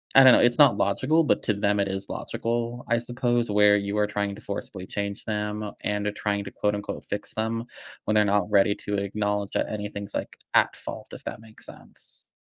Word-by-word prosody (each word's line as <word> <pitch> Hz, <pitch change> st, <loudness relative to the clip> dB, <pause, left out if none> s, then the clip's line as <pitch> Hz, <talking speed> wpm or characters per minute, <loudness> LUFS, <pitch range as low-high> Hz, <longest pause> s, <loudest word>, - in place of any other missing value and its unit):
I 135 Hz, -, +10 dB
don't 130 Hz, -, +10 dB
know, -, -, +6 dB
it's 120 Hz, 0 st, +4 dB
not 145 Hz, -4 st, +7 dB
logical, 135 Hz, +11 st, +2 dB
but 150 Hz, -, +2 dB
to 105 Hz, -, +1 dB
them, 100 Hz, 0 st, +1 dB
it 100 Hz, -, +2 dB
is 95 Hz, 0 st, -4 dB
logical, 120 Hz, +1 st, -3 dB
I 120 Hz, -, +3 dB
suppose, 120 Hz, -1 st, 0 dB
where 105 Hz, 0 st, +5 dB
you 100 Hz, +1 st, -2 dB
are 105 Hz, 0 st, +3 dB
trying 100 Hz, -1 st, -2 dB
to -, -, -12 dB
forcibly 100 Hz, -2 st, -6 dB
change 100 Hz, 0 st, -4 dB
them, 105 Hz, 0 st, -3 dB
and 105 Hz, 0 st, -1 dB
are 105 Hz, -, +1 dB
trying 100 Hz, 0 st, -2 dB
to, 100 Hz, -, -8 dB
quote, 105 Hz, 0 st, 0 dB
unquote, 105 Hz, 0 st, -6 dB
"fix 105 Hz, -, -5 dB
them," 115 Hz, +1 st, -1 dB, 0.4 s
when 110 Hz, -, 0 dB
they're 105 Hz, -1 st, +5 dB
not 100 Hz, 0 st, +1 dB
ready 100 Hz, 0 st, +4 dB
to 105 Hz, -, -4 dB
acknowledge 100 Hz, 0 st, -1 dB
that -, -, 0 dB
anything's, 105 Hz, -1 st, -5 dB
like, -, -, -4 dB, 0.2 s
at -, -, +4 dB
fault, -, -, -8 dB
if -, -, -9 dB
that -, -, -6 dB
makes 110 Hz, 0 st, -13 dB
sense. -, -, -10 dB
105 Hz, 215 wpm, -26 LUFS, 100-115 Hz, 0.4 s, I